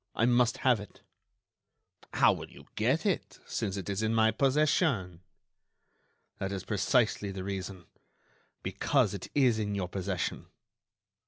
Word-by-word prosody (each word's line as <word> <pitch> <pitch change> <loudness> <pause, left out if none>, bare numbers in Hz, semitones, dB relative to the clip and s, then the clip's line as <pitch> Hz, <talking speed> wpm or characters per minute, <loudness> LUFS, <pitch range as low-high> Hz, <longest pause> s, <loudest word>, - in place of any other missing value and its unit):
I 115 - +2
must 120 -1 +3
have 125 -4 +5
it." 105 - -12 1.1
"How - - +5
will - - -7
you - - -15
get - - +1
it, - - -1
since 100 0 -3
it 95 - -5
is 100 +1 -2
in 110 +1 +1
my 110 0 +4
possession?" 135 - +1 1.2
"That 95 0 -2
is 95 -2 -4
precisely 105 0 +1
the 95 -1 -5
reason—because 95 -2 -3
it - - -6
is 125 -6 +4
in 105 -1 -2
your 95 -3 -2
possession." 95 0 -3
105 Hz, 135 wpm, -30 LUFS, 95-120 Hz, 1.2 s, have